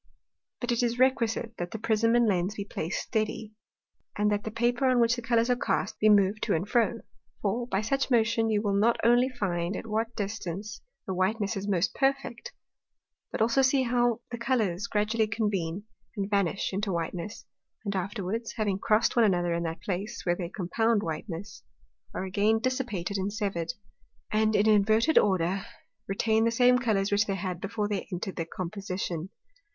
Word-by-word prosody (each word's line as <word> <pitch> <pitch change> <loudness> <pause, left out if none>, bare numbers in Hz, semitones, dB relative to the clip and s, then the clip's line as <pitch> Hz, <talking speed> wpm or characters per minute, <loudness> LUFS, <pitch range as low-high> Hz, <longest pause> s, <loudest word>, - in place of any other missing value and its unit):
But 245 0 -2
it 235 - +1
is 240 0 0
requisite, 235 -3 +1
that 175 0 -3
the 220 - -5
Prism 230 +1 +2
and 240 0 +4
Lens 190 0 0
be 200 - -4
placed 165 -3 -3
steady, 215 -1 -2 0.6
and 210 0 +2
that 205 0 0
the - - -2
Paper, 240 +4 +1
on 255 -1 +3
which 235 0 +4
the 240 - -5
Colours 230 0 +2
are 250 - +3
cast, - - -1
be 215 - +5
moved 205 0 +4
to - - +1
and 170 +5 -2
fro; 235 0 +1 0.4
for, 235 +4 0
by 195 -4 0
such 275 +6 0
motion, 225 -2 +2
you 210 -1 +1
will 200 -2 +1
not 220 +4 +3
only 245 +2 +4
find 185 -6 -2
at - - -5
what 225 +1 -2
distance 205 -1 -4 0.2
the 190 - -3
whiteness 200 +3 0
is 195 +1 -4
most 190 -3 +1
perfect, 275 - -1 0.8
but - - -3
also 235 +4 +3
see 265 0 +3
how 240 -1 +1
the 235 - -5
Colours 220 -7 0
gradually 215 +1 +1
convene, 205 -4 -2 0.3
and 200 +1 -2
vanish 200 -1 0
into 200 +1 -1
whiteness; 170 +3 -4 0.4
and 200 -1 -2
afterwards, 200 +4 -3
having 205 -4 -1
crossed 215 +2 +2
one 235 - +5
another 175 -3 +1
in 170 - -1
that 165 -1 -4
place 200 +4 -4
where 175 -1 +2
they 175 -2 -4
compound 215 +4 0
whiteness, 165 +4 -5 0.5
are - - -4
again 205 +4 +2
dissipated 225 -6 -2
and 195 +1 -2
severed, 200 -5 -2 0.6
and 215 0 +2
in 210 +1 +3
an 215 - +6
inverted 220 +8 +4
order 190 -1 +1 0.5
retain 220 +3 +1
the 230 - +3
same 250 +2 +4
Colours, 210 -5 0
which 205 +2 +2
they 195 - 0
had 185 -2 -4
before 205 +1 -2
they 205 -3 -3
entred 185 +2 -4
the 165 - -1
Composition. 185 -1 -4
210 Hz, 185 wpm, -28 LUFS, 190-230 Hz, 0.8 s, an